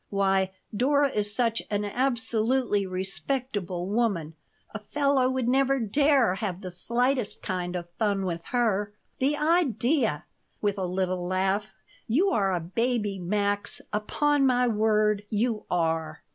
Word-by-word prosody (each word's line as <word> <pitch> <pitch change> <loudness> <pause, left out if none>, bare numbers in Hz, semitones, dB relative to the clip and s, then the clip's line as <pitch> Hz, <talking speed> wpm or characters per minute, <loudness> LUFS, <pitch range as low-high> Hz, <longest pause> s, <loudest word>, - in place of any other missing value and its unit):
Why, 195 -1 +2 0.3
Dora 280 +5 +3
is 205 -1 -1
such 230 0 0
an 205 0 -1
absolutely 230 -2 0
respectable 190 0 -3
woman, 200 -8 0 0.4
a 220 - -4
fellow 275 +3 +1
would 260 -2 -1
never 270 +2 +3
dare 265 -1 +3
have 195 -2 -4
the 185 -2 -6
slightest 245 +5 -1
kind 180 -1 -3
of 175 -1 -4
fun 200 -3 +1
with 170 -2 -3
her. 210 -4 0 0.3
The 285 +3 +1
idea!" 275 - +1 0.3
with 205 -1 -1
a 185 - -1
little 180 0 -1
laugh. 190 +2 -1 0.3
"You 335 - +2
are 195 - +2
a 180 - 0
baby, 210 +3 -1
Max. 205 +2 -1
Upon 290 +7 +1
my 250 -2 +3
word, 215 -2 +2
you 220 0 -1
are. 160 -2 -1
210 Hz, 135 wpm, -27 LUFS, 190-250 Hz, 0.4 s, Dora